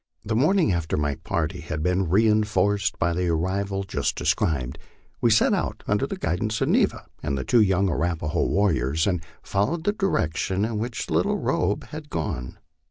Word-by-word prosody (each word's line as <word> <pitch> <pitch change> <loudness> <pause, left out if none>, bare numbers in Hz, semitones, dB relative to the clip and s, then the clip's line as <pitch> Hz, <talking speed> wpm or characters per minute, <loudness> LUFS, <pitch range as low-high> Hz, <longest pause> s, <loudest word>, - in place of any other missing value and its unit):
The 110 - -1
morning 160 - +3
after 85 -3 -1
my 75 -1 0
party 85 +5 -3
had 80 -2 -4
been 90 0 +1
reinforced 105 0 +2
by 85 0 +1
the 90 +1 -1
arrival 95 +4 -1
just 95 - -2
de - - -5
scribed, 65 -6 0 0.4
we 120 - +4
set 110 - +4
out - - -2
under - - +1
guidance 105 +6 -2
of - - +1
Neva - - +2 0.2
and 70 - -2
the 65 - -2
two 115 - +4
young 95 -1 +3
Arapaho 85 -2 0
war 100 0 +2
riors, 80 +1 0
and 90 -5 0 0.2
followed 130 +13 0
the 205 - +1
direction 95 - 0
in 110 -1 -2
which 115 +1 -4
Little - - +2
Robe 100 +3 0
had 150 -1 -8
gone. 65 - -4
95 Hz, 175 wpm, -25 LUFS, 80-110 Hz, 0.4 s, we